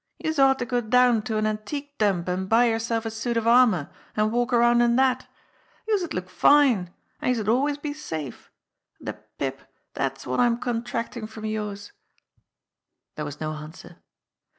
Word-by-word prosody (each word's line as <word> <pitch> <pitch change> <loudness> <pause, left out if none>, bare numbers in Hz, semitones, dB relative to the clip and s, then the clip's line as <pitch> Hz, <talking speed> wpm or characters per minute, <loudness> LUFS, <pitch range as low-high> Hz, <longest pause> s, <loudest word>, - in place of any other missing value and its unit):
Youse 315 -2 -2
ought 270 0 +5
to 245 - -3
go 245 0 0
down 240 0 +4
to 220 -3 -1
an 215 - +1
antique 280 +7 -4
dump 195 -5 +1
an' 185 +1 -2
buy 230 +4 +5
yerself 225 0 -1
a 225 - -2
suit 230 +2 -2
of 230 - 0
armour, 230 - +4 0.3
an' 215 0 +2
walk 240 +2 0
around 240 0 +4
in 235 0 +3
dat. 255 0 +2 0.6
Youse'd 395 -6 0
look 180 0 -3
fine 230 -3 +4 0.3
an' - - 0
youse'd 225 -5 0
always 280 +6 +2
be 290 0 -4
safe. 160 - -7 0.5
De - - -4
pip, - - -6 0.3
dat's - - -3
wot 130 - -2
I'm 240 -1 +3
contractu!' 235 -1 -3
from 220 0 -8
youse!" 210 -2 -4 1.2
There 150 - -5
was 145 -1 -7
no 155 0 -3
answer. 155 +2 -10
230 Hz, 170 wpm, -25 LUFS, 210-250 Hz, 1.2 s, ought